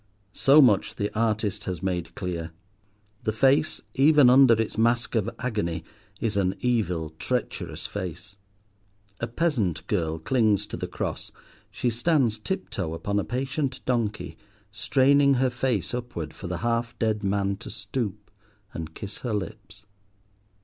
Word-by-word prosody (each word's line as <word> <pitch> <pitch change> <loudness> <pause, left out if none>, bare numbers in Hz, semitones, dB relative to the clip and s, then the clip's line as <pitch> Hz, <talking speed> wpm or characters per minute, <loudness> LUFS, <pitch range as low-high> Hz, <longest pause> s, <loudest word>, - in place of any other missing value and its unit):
So 140 +2 +6
much 105 -6 +3
the 100 0 -2
artist 110 -2 0
has 90 -1 -4
made 90 -3 -2
clear. 85 -4 -4 0.7
The 110 - 0
face, 135 +7 +2
even 140 -2 +6
under 130 -2 +7
its 110 - -1
mask 115 +2 +2
of 110 -2 +1
agony, 105 -10 -2 0.4
is 110 -3 -1
an 95 -1 +1
evil, 90 -10 0
treacherous 125 -2 -3
face. 95 +1 -6 0.8
A 115 - -2
peasant 115 - 0
girl 80 -6 -1
clings 110 +3 +2
to - - -6
the - - -4
cross; - - -4 0.4
she 120 - -1
stands 120 -3 +1
tip 190 - -4
toe 80 -4 -3
upon 100 +5 -1
a - - 0
patient 135 +2 -2
donkey, 115 -4 -1 0.3
straining 140 +6 +4
her 130 0 +2
face 120 -7 -1
upward 120 -11 -4
for 95 - -8
the 90 0 -3
half 115 0 -1
dead 110 -2 0
man 100 0 0
to - - -9
stoop 105 -5 -4 0.4
and 80 0 -6
kiss 100 0 -7
her 120 -4 -2
lips. 105 0 -7
110 Hz, 145 wpm, -26 LUFS, 95-125 Hz, 0.8 s, under